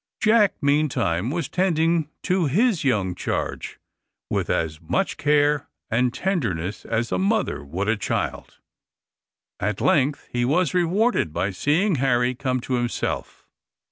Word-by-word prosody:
Jack, 215 -3 +4
meantime, 140 - +1
was 165 -1 -2
tending 165 -3 +1
his 185 - +2
young 105 -9 +1
charge - - -4 0.5
with - - -1
as 80 -1 -1
much 80 - -1
care 145 0 +2 0.2
and 125 +2 +2
tenderness 105 - -2
as 115 +1 -1
a - - 0
mother 200 - 0
would 90 +9 -3
a 115 - +3
child. 95 - -3 1.0
At - - -1
length 140 +3 +1
he 120 0 +1
was 155 +5 +1
rewarded 180 - +1
by 95 +5 -1
seeing 160 - +1
Harry 125 -1 +2
come 130 0 -1
to 130 - -4
himself. 120 -1 -2
140 Hz, 130 wpm, -23 LUFS, 115-175 Hz, 1.0 s, Jack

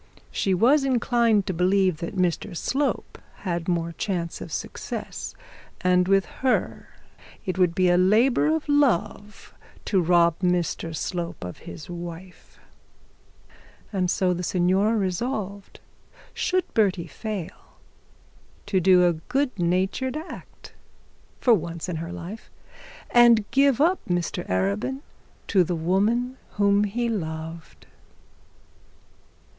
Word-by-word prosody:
She 190 -2 0
was 265 +10 +4
inclined 235 -5 +2
to 190 - -2
believe 185 0 +2
that 170 +5 -6
Mr 175 -2 -1
Slope 275 - -2 0.2
had 175 -3 -3
more 170 -2 0
chance 170 -2 -3
of - - -8
success; - - -5 0.5
and 180 -1 +3
with 195 0 +3 0.2
her 260 -1 0 0.6
it 185 0 -3
would 175 -2 +3
be 185 -1 +3
a 175 0 +4
labour 225 +10 +4
of 315 0 0
love 210 -8 0 0.3
to 190 -3 +2
rob 170 -1 +3
Mr 175 -2 -1
Slope 170 - -4
of 90 0 -7
his 85 -2 -9
wife. 175 +1 -9 1.4
And 185 -2 0
so 185 0 +1
the 175 - -4
signora 190 +5 +2
resolved, 200 0 -3 0.5
should 370 0 0
Bertie 190 -6 +2
fail, 190 +2 -7 0.9
to 200 -2 +1
do 180 0 +5
a 175 - +3 0.2
good 270 -6 0
natured 190 - 0
act 315 +3 -10 0.7
for 245 - +4
once 170 -4 -2
in 175 -3 -3
her 165 +2 -5
life, 180 +5 -8 0.6
and 235 -3 +6
give 275 0 +3
up 345 +5 +3
Mr 175 -2 -2
Arabin 100 - -1 0.5
to 190 -3 +4
the 175 +1 -2
woman 210 +10 0 0.2
whom 205 0 +3
he 235 +4 -1
loved. 160 -5 -5
185 Hz, 120 wpm, -25 LUFS, 175-225 Hz, 1.4 s, and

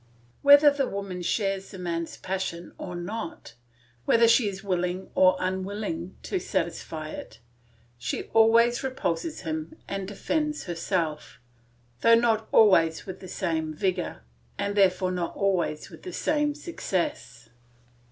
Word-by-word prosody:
Whether 285 +1 +8
the 280 -2 0
woman 195 -2 -5
shares 195 +1 -1
the 195 - -9
man's 170 -2 -3
passion 185 -2 -4
or 180 -2 -6
not, 175 +1 -6 0.5
whether 230 +7 +5
she 230 -1 +5
is 195 +1 -8
willing 180 -1 -2
or 185 0 +5
unwilling 200 - -3
to 380 - -2
satisfy 165 - -3
it, 110 - -9 0.6
she 125 +3 -3
always 230 +2 +5
repulses 260 - -2
him 160 -1 -4
and 195 -1 -4
defends 300 +9 -2
herself, 165 -4 -2 0.6
though 230 - +6
not 225 -2 +2
always 165 -7 +5
with 190 -1 -7
the 185 - -10
same 160 -3 -2
vigour, 180 - -2 0.3
and 200 0 -2
therefore 185 -2 +3
not 180 -2 -3
always 185 -6 0
with - - -12
the 365 - -8
same 295 -1 0
success. 175 - -4
190 Hz, 130 wpm, -27 LUFS, 170-230 Hz, 0.6 s, Whether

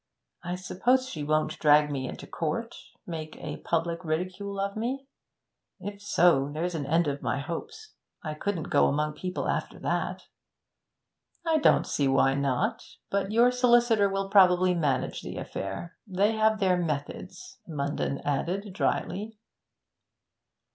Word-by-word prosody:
'I 175 +1 -3
suppose 245 +8 +1
she 160 - -5
won't 155 +1 0
drag 150 -1 +5
me 130 -2 -2
into - - -7
court 230 +9 -3 0.3
make 160 -3 -6
a - - -6
public 170 +1 -1
ridicule 185 +5 -3
of 200 0 -2
me? 255 +5 -3 0.7
If 200 +2 -7
so, 170 -8 +3
there's 170 +4 -2
an 145 -4 -3
end 165 +2 +2
of 140 0 -2
my - - -1
hopes. 170 - -6 0.3
I 155 -2 -3
couldn't 170 +1 -3
go - - +5
among 150 +2 0
people 180 +4 -4
after - - -2
that.' - - -2 1.2
'I 320 -1 +3
don't - - +4
see 140 - 0
why 135 0 +4
not. 135 -2 0 0.3
But 200 0 0
your 235 +3 +5
solicitor 240 -4 +4
will 195 0 -1
probably 185 -2 +6
manage 150 -6 0
the - - -7
affair. 100 - -5
They 200 +2 +2
have 220 -1 +2
their 185 -3 +3
methods,' 180 - -4
Munden 140 -3 -2
added 180 +8 -1
drily. 210 +2 -2
180 Hz, 140 wpm, -28 LUFS, 150-205 Hz, 1.2 s, probably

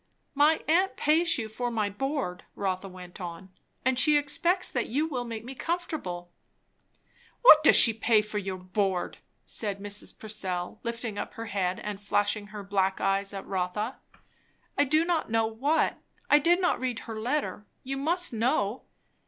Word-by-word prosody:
"My 295 +3 +3
aunt 365 +5 +2
pays 330 +2 +3
you 225 -3 -3
for 245 +3 -3
my 220 -3 0
board," 205 -3 -3
Rotha 190 -1 -2
went 180 0 -11
on, 180 +2 -7 0.3
"and 260 -1 +2
she 295 +3 +5
expects 345 +6 +1
that 245 - -2
you 285 +7 0
will 250 -6 -3
make 230 -1 -6
me 260 - -7
comfortable." 265 - -4 1.1
"What 310 -11 +10
does - - +7
she 230 - +8
pay 220 -1 +3
for 210 0 -3
your 190 -1 -4
board?" 185 0 -2 0.3
said 205 -3 -3
Mrs. 205 +1 -4
Purcell, 190 -2 -4
lifting 230 -3 -4
up - - -6
her 230 - -6
head 190 -3 -1
and 210 -1 -5
flashing 205 +1 0
her 210 -1 -8
black 195 -1 0
eyes 195 0 +1
at 195 -1 -6
Rotha. 195 +6 -3 0.8
"I 285 - +3
do 310 +4 +3
not 340 -6 0
know 225 0 +2
what. 265 +9 0 0.3
I 295 - +8
did 340 +4 +3
not 360 - +1
read 250 -2 -2
her 225 -1 -7
letter. 245 -4 -2 0.2
You 270 +1 -4
must 335 +2 +1
know." 225 -1 0
225 Hz, 170 wpm, -28 LUFS, 195-290 Hz, 1.1 s, What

